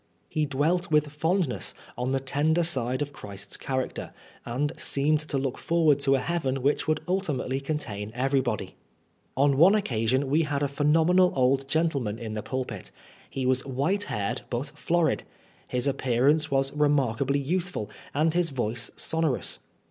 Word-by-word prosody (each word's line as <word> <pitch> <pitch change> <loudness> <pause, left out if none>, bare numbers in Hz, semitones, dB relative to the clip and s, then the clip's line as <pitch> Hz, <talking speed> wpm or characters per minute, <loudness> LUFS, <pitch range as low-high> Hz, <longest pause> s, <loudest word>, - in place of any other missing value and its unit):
He 155 -1 -1
dwelt 160 +6 +1
with 150 -2 +2
fondness 165 +4 -1 0.2
on 125 +1 -2
the 135 - +1
tender 150 +5 +1
side 130 -5 0
of 145 0 -8
Christ's 100 -6 -7
character, 130 -1 -3 0.3
and 140 +5 -1
seemed 150 +2 +1
to 150 -2 -3
look 135 -1 -2
forward 160 -4 +3
to 135 -1 +3
a - - +1
heaven 135 -4 -1
which 145 +2 +1
would 155 -1 +1
ultimately 150 -8 -1
contain 115 -8 -4
every 135 +2 +2
body. 120 -5 -3 0.6
On 140 0 +4
one 180 +8 +7
occasion 130 - +1
we 150 +4 +3
had 145 -2 -1
a - - +2
phenomenal 160 +6 +3
old 135 +1 +2
gentle 160 -1 +1
man 105 -2 -3
in 115 -2 -5
the 110 - -3
pulpit. 125 -6 -4 0.4
He 135 -1 -3
was 130 0 +2
white 145 +10 0
haired 100 -2 -2
but 120 +3 -2
florid. 165 +1 +1 0.5
His 125 0 -1
appearance 140 +3 +2
was 135 0 +1
remarkably 140 -2 +2
youthful, 165 - -2 0.2
and 155 +2 +2
his 175 -1 +2
voice 120 -3 -2
sonorous. 160 -4 -1
140 Hz, 160 wpm, -27 LUFS, 130-155 Hz, 0.6 s, one